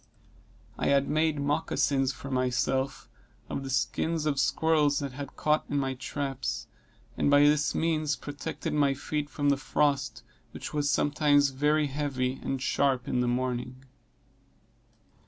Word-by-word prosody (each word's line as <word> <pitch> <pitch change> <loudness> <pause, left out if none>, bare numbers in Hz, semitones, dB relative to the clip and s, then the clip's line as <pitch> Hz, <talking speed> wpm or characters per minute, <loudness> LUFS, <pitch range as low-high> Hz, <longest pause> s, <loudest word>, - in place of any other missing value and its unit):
I - - 0
had 140 0 +3
made 155 0 +1
moccasins 140 -1 +1
for 135 0 -9
myself, 130 +1 0 0.4
of 135 - -3
the 135 - -5
skins 160 +4 0
of 145 -3 0
squirrels 145 +2 +2
that 140 -3 -3
I - - -12
had 140 -2 -7
caught 155 0 +1
in 145 - -1
my 135 -1 0
traps, 130 -3 -4 0.5
and - - +1
by 145 0 +6
this 145 0 +3
means 155 -2 +1
protected 150 +2 -5
my 140 -2 +2
feet 145 +1 -3
from 145 -1 0
the 140 - +3
frost, 145 0 0 0.3
which - - -7
was 145 -1 0
sometimes 145 -1 +3
very 150 +3 +2
heavy 135 -2 -2
and 135 - -2
sharp 135 -1 +1
in 125 - 0
the 125 - +1
morning. 125 +1 -2
140 Hz, 150 wpm, -28 LUFS, 130-150 Hz, 0.5 s, by